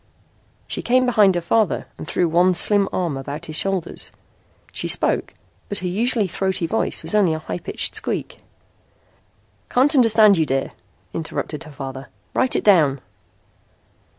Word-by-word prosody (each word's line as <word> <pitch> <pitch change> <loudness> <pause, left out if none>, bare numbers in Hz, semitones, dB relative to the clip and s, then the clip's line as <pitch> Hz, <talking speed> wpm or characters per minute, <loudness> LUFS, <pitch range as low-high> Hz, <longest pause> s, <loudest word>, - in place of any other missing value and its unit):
She - - -3
came 255 +1 +2
behind 210 -6 +4
her 175 - 0
father 215 +5 +1
and - - -9
threw 175 - +1
one 175 +3 +3
slim 200 +2 +3
arm 170 -6 -1
about 145 +4 -6
his 155 -2 -6
shoulders. 190 0 -1 0.6
She - - -4
spoke, - - 0 0.3
but 205 - -1
her 185 - -2
usually 220 +4 +1
throaty 190 -1 -1
voice 220 +7 -1
was - - -2
only 190 -7 +3
a - - -3
high 155 +2 -5
pitched - - -2
squeak. - - -3 1.3
"Can't 270 +5 +3
understand 220 - +5
you, 160 - +3
dear," 135 0 -1 0.4
interrupted 155 -1 -5
her 155 - -11
father. 135 -1 -8 0.2
"Write 260 - +1
it - - 0
down." 155 -9 +4
185 Hz, 150 wpm, -21 LUFS, 160-215 Hz, 1.3 s, understand